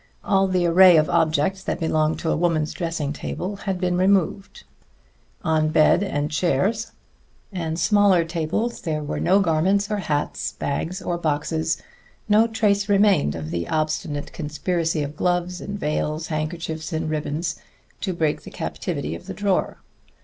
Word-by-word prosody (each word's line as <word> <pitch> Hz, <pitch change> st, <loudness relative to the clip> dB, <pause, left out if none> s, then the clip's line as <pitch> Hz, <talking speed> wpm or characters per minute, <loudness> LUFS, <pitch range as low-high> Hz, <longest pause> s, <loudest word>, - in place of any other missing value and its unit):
All 195 Hz, -1 st, +3 dB
the 185 Hz, -2 st, +1 dB
array 175 Hz, 0 st, +7 dB
of 155 Hz, 0 st, +2 dB
objects 160 Hz, +5 st, +1 dB
that -, -, -2 dB
belong 155 Hz, -1 st, +1 dB
to 160 Hz, -, -1 dB
a -, -, +2 dB
woman's 160 Hz, -2 st, 0 dB
dressing 165 Hz, -5 st, -3 dB
table 185 Hz, +6 st, -4 dB
had 195 Hz, -2 st, -3 dB
been 180 Hz, -1 st, 0 dB
removed; 195 Hz, +1 st, +1 dB, 0.8 s
on 155 Hz, -2 st, +2 dB
bed 155 Hz, +3 st, +4 dB
and 145 Hz, -7 st, -2 dB
chairs 185 Hz, +8 st, 0 dB, 0.6 s
and 165 Hz, -4 st, -3 dB
smaller 200 Hz, -5 st, +4 dB
tables 170 Hz, +8 st, -2 dB
there 155 Hz, -3 st, -2 dB
were 145 Hz, -, -3 dB
no 190 Hz, +2 st, +4 dB
garments 195 Hz, +5 st, +1 dB
or 210 Hz, -, +1 dB
hats, 150 Hz, -7 st, -2 dB
bags 175 Hz, +6 st, -3 dB
or 175 Hz, -1 st, -2 dB
boxes; 160 Hz, +1 st, -1 dB, 0.4 s
no 215 Hz, +2 st, +5 dB
trace 205 Hz, -2 st, +1 dB
remained 200 Hz, -, +3 dB
of 80 Hz, -1 st, -6 dB
the 85 Hz, -1 st, -2 dB
obstinate 155 Hz, -2 st, -2 dB
conspiracy 160 Hz, +1 st, -1 dB
of 145 Hz, +1 st, -6 dB
gloves 180 Hz, +1 st, -1 dB
and 200 Hz, 0 st, -5 dB
veils, 155 Hz, 0 st, -1 dB
handkerchiefs 160 Hz, +1 st, -4 dB
and 160 Hz, 0 st, -2 dB
ribbons, 155 Hz, +1 st, -2 dB, 0.4 s
to 190 Hz, -, -2 dB
break 160 Hz, -4 st, 0 dB
the -, -, -10 dB
captivity -, -, -4 dB
of 85 Hz, -, -9 dB
the -, -, -6 dB
drawer. 200 Hz, -3 st, 0 dB
165 Hz, 155 wpm, -23 LUFS, 155-190 Hz, 0.8 s, array